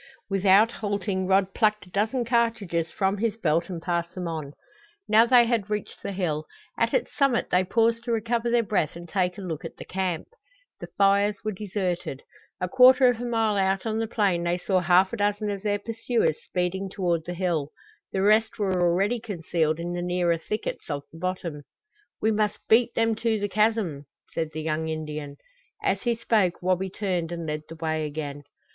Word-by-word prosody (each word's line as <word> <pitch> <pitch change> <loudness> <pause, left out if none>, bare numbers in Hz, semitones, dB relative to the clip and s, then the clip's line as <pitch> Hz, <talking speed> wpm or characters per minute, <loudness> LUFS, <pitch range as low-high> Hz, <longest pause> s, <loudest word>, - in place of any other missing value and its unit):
Without 195 +3 +5
halting 200 -3 -2
Rod 190 0 +2
plucked 215 -2 +1
a - - -17
dozen 220 +6 0
cartridges 220 -9 0
from 195 0 0
his 225 -1 0
belt 170 -3 +1
and 175 -3 -4
passed 170 0 -2
them 180 -2 -4
on. 155 -4 -5 0.5
Now 220 +2 +6
they 245 -1 +6
had 230 -4 0
reached 210 -1 -4
the 200 - -4
hill. 160 -5 -2 0.3
At - - +1
its - - -1
summit 275 -4 +1
they 180 +1 +4
paused 230 +4 +1
to 240 - -2
recover 230 +1 0
their 235 0 +3
breath 185 -8 0
and 170 0 -9
take 180 0 0
a - - -6
look 160 -4 -5
at - - -8
the - - -9
camp. 185 -3 -2 0.5
The - - -7
fires 200 +1 +3
were 215 - -1
deserted. 185 -7 -3 0.4
A 180 - -1
quarter 255 +4 +7
of 240 -1 -1
a - - -3
mile 225 -3 +1
out 195 +1 +1
on 220 0 -1
the 225 - -1
plain 195 -6 +1
they 175 +1 0
saw 185 +1 +1
half 180 +2 +4
a - - -2
dozen 205 0 0
of 200 -1 -4
their 205 -1 0
pursuers 225 -4 -1
speeding 190 +2 -2
toward 175 -4 -1
the 175 - -5
hill. 170 -5 -1 0.4
The 190 - 0
rest 215 +2 +3
were 190 -3 0
already 195 +7 +2
concealed 165 -7 -1
in 175 +1 -3
the 175 - -3
nearer 175 -1 +1
thickets 210 +1 -4
of 145 -2 -3
the 165 - -12
bottom. 180 -4 -3 0.6
"We 220 - +2
must 210 -1 0
beat 235 +2 +4
them 225 0 +2
to 225 -1 0
the 205 - -1
chasm!" 205 - 0 0.3
said 160 -1 -2
the 155 0 -5
young 160 0 -1
Indian. 155 -2 -5 0.5
As 195 0 +1
he 240 -1 +1
spoke 215 -6 +1
Wabi 185 +1 0
turned 180 -4 -2
and 170 -1 -4
led 150 0 -3
the 165 - -8
way 160 -1 -2
again. 145 -1 -5
190 Hz, 195 wpm, -26 LUFS, 170-220 Hz, 0.6 s, quarter